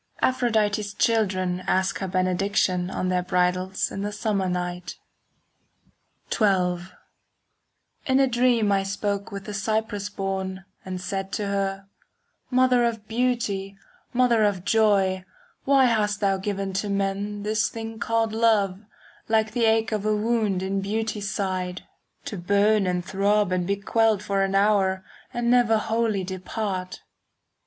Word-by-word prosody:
5 - - +4
Aphrodite's 215 -4 0
children 185 -5 +1
Ask 190 0 +1
her 190 - -3
benediction 185 0 +1
On 185 - -2
their 180 0 +1
bridals 180 +1 0
in 195 - -4
the 205 +1 -2
summer 205 -3 -1
night. 180 0 -4 1.4
XII 180 -4 +1 1.2
In 260 0 +3
a 270 - +5
dream 240 -4 +2
I 195 -1 +3
spoke 200 +2 -3
with 200 -1 -6
the 210 - -6
Cyprus 205 0 -1
born, 190 -1 -4 0.2
And 185 -1 -5
said 195 +1 -4
to 210 - -1
her, 195 -1 -2 0.6
"Mother 255 -1 +4
of 225 -3 -2
beauty, 220 -5 -1 0.3
mother 240 -3 +3
of 200 -3 0
joy, 200 -4 +3 0.4
Why 270 -1 +5
hast 210 -3 +1
thou 195 -2 +2
given 195 0 -3
to 210 - -5
men 200 +1 -2
"This 215 +1 +1
thing 225 0 -7
called 225 0 0
love, 215 -4 +2 0.5
like 220 -1 +2
the 230 +1 +1
ache 225 0 +2
of 210 -2 -1
a 215 0 +1
wound 215 -3 0
5 - - -3
In 195 0 -1
beauty's 210 0 -2
side, 185 -2 -3 0.4
To 205 - -5
burn 200 +3 +2
and 180 -1 -1
throb 200 0 +1
and 180 -1 0
be 200 - +1
quelled 215 +1 +1
for 200 -2 0
an 195 0 0
hour 195 -2 +2 0.3
And 240 0 0
never 240 -3 +4
wholly 220 -2 0
depart?" 185 0 -4
200 Hz, 145 wpm, -25 LUFS, 190-220 Hz, 1.4 s, a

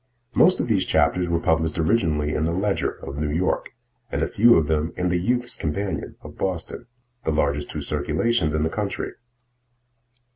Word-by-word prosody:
Most 185 +2 +5
of - - 0
these 100 -5 +1
chapters 90 -1 +2
were 85 -1 +1
published 80 0 +1
originally 80 -4 +1
in 80 - 0
"The 85 - 0
Ledger" 100 +3 0 0.2
of 70 - -6
New 75 0 -1
York, 85 +5 0 0.4
and - - 0
a - - +1
few 120 +3 +5
of 80 - +3
them 80 +1 0
in 90 0 0
"The 90 0 +1
Youths' 120 +6 0
Companion" 95 +6 -3
of - - -11
Boston, 95 +5 -3 0.4
the - - -1
largest 75 -1 0
two - - -4
circulations 75 +4 0
in 75 - +1
the 80 - +1
country. 105 -2 -3
85 Hz, 180 wpm, -23 LUFS, 75-100 Hz, 0.4 s, Most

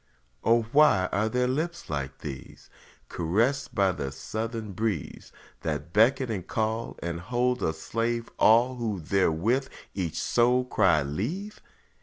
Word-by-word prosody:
O 115 0 +4
why 140 -11 +5
are 110 +2 +1
there 125 +1 +1
lips 165 +6 -2
like 70 -1 -4
these? 70 -4 -9 0.4
Caressed 115 - 0
by 100 -2 +3
the 70 -6 -4
southern 110 - -5
breeze, 100 -5 -3 0.3
That 85 - -4
beckon 120 +3 +3
and 95 -5 -4
call 110 +1 -2
and 85 0 -3
hold 125 +7 0
a - - +1
slave 115 +8 -3
All 120 +3 +5
who 110 -5 -2
therewith 100 - +1 0.2
each 85 -5 -3
soul 125 +1 +2
cry 95 - +3
leave? 150 - -4
110 Hz, 135 wpm, -27 LUFS, 90-125 Hz, 0.4 s, why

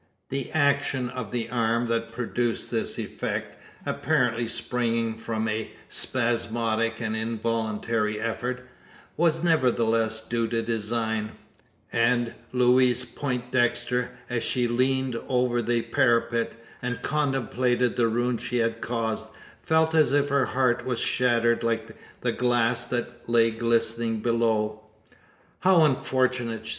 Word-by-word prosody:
The 135 -1 -2
action 140 -4 +1
of 125 -4 -5
the 120 -2 -2
arm 115 0 +1
that 115 0 -1
produced 120 0 -2
this - - -1
effect, - - -4 0.3
apparently 125 -6 +1
springing 115 0 0
from 110 0 -3
a 110 0 -2 0.2
spasmodic 115 -2 0
and 110 -2 -2
involuntary 110 -1 -1
effort, 125 +3 -3 0.5
was 165 0 +2
nevertheless 115 -8 +2
due 115 +1 -2
to 115 0 -1
design; 110 -1 -2 0.6
and 120 0 +2 0.2
Louise 125 0 +3
Poindexter, 125 -2 -1 0.2
as 120 -2 -2
she 120 +1 +1
leant 130 +1 +1
over 125 -1 +1
the 120 0 0
parapet, 115 0 +1 0.3
and 125 0 -4
contemplated 130 -4 0
the 120 -2 +3
ruin 120 +1 0
she 125 - -2
had 115 -1 0
caused, 110 -2 -2 0.3
felt 160 -1 +2
as 155 -5 +4
if 145 0 +2
her 140 -2 +2
heart 125 -2 +1
was 125 -2 -2
shattered 120 -2 +2
like 115 -1 -2 0.3
the - - +1
glass 120 -2 +1
that 120 -1 -4
lay 115 -1 +4
glistening 115 0 +1
below! 110 -2 0 0.8
"How 185 -3 +5
unfortunate!" 130 -5 0
120 Hz, 120 wpm, -26 LUFS, 115-125 Hz, 0.8 s, How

